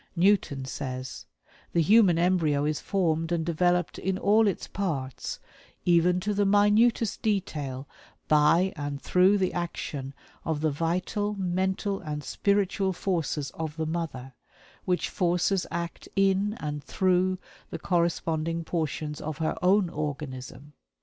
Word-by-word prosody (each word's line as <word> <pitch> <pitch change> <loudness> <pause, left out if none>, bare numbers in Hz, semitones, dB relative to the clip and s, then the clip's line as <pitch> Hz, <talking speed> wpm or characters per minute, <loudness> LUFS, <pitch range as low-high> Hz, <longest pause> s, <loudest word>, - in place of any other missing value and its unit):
Newton 170 -7 +2
says: 130 -1 -6 0.5
"The 170 - +3
human 195 -1 +5
embryo 165 -5 +2
is 150 0 0
formed 165 -4 0
and 165 -2 0
developed 175 +1 +1
in 190 0 -1
all 210 +3 +4
its 195 - -2
parts, 145 -10 -3 0.5
even 175 +1 +4
to 210 +3 -1
the 205 0 +2
minutest 210 +3 +3
detail, 150 -10 -2 0.4
by 155 +5 +4
and 145 -1 -4
through 185 +6 +4
the 185 -2 0
action 145 -5 -4 0.3
of 155 -2 -2
the 155 -1 +2
vital, 185 +7 -1
mental, 190 +1 -1
and 150 -3 -5
spiritual 195 0 +1
forces 160 -7 -2
of 160 -2 -5
the 160 - -1
mother, 155 -6 -4 0.5
which 180 -1 0
forces 180 +1 +1
act 170 0 -5
in 195 +2 +2
and 150 -1 -4
through 185 0 +1 0.3
the - - -5
corresponding 165 -2 0
portions 155 -2 -3
of 155 -1 -4
her 160 -1 -1
own 185 +1 +4
organism. 145 -3 -6
170 Hz, 130 wpm, -27 LUFS, 150-190 Hz, 0.5 s, human